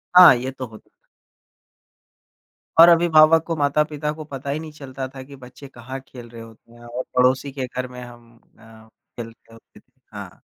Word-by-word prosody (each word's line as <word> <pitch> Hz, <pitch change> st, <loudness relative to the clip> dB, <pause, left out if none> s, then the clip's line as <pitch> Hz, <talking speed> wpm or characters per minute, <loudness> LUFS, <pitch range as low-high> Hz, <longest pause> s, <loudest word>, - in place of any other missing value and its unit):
हाँ 180 Hz, -8 st, +10 dB
ये 130 Hz, +2 st, -4 dB
तो 130 Hz, -1 st, -7 dB
होत 110 Hz, -1 st, -15 dB, 2.0 s
और 170 Hz, +1 st, +10 dB
अभिभावक 165 Hz, -1 st, +5 dB
को 165 Hz, -1 st, -3 dB
माता-पिता 150 Hz, +1 st, -1 dB
को 155 Hz, 0 st, -9 dB
पता 140 Hz, -2 st, -8 dB
ही 145 Hz, +2 st, -2 dB
नहीं 160 Hz, -1 st, -9 dB
चलता 135 Hz, -3 st, -7 dB
था 130 Hz, -, -8 dB
कि 140 Hz, +1 st, -13 dB
बच्चे 130 Hz, +2 st, -13 dB
कहाँ 130 Hz, +1 st, -9 dB
खेल 120 Hz, -2 st, -12 dB
रहे 115 Hz, -1 st, -11 dB
होते 115 Hz, +1 st, -16 dB
हैं 120 Hz, 0 st, -16 dB
और 120 Hz, +2 st, -5 dB
पड़ोसी 130 Hz, +2 st, +2 dB
के 130 Hz, -1 st, -4 dB
घर 125 Hz, +1 st, -5 dB
में 125 Hz, 0 st, -11 dB
हम 120 Hz, -1 st, -14 dB, 0.2 s
अ, 110 Hz, 0 st, -17 dB, 0.3 s
खेल 115 Hz, -1 st, -6 dB, 0.2 s
ओ -, -, -14 dB
केत -, -, -22 dB, 0.3 s
हाँ। -, -, -10 dB
130 Hz, 180 wpm, -21 LUFS, 120-150 Hz, 2.0 s, हाँ